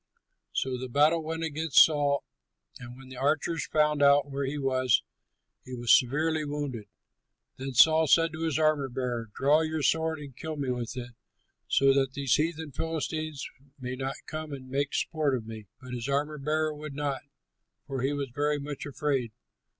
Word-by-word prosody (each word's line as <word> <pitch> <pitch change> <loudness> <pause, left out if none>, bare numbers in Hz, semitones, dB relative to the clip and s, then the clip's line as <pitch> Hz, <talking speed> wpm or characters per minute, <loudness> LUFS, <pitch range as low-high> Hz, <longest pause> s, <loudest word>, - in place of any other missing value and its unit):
So 130 -1 -2
the 130 0 -5
battle 150 +6 +4
went 160 +1 -4
against 160 -2 +5
Saul, 145 -2 0 0.6
and 125 0 -10
when 135 0 -13
the 130 - -10
archers 155 +4 0
found 150 -1 +2
out 140 0 +5
where 140 0 -2
he 140 +2 -3
was, 130 -3 +2 0.6
he 130 - -7
was 120 -1 +1
severely 155 +5 +1
wounded. 145 -7 -4 0.7
Then 130 0 -5
Saul 160 +5 +6
said 165 +2 +4
to 160 - -6
his 160 -3 0
armor 155 -3 +2
bearer, 120 -3 -3
"Draw 145 +4 +4
your 160 -1 -2
sword 160 +1 +1
and 140 -4 -10
kill 160 +4 -5
me 140 -3 -2
with 125 0 -4
it, 125 -1 -6 0.6
so 135 0 +4
that 135 -1 +1
these 135 -3 0
heathen 160 0 0
Philistines 155 0 -3 0.3
may 125 0 -4
not 135 +1 -3
come 155 -1 -6
and 130 -2 -8
make 140 +1 -1
sport 155 -5 0
of 115 -3 -5
me." 110 -2 -9
But 125 -1 -9
his 120 +2 -4
armor 145 +2 -1
bearer 155 +2 0
would 150 -1 -8
not, 140 -2 -2 0.6
for 135 -3 -4
he 135 +2 +1
was 140 -2 -3
very 145 +2 +1
much 145 0 -6
afraid. 140 -4 -1
145 Hz, 180 wpm, -28 LUFS, 130-155 Hz, 0.7 s, Saul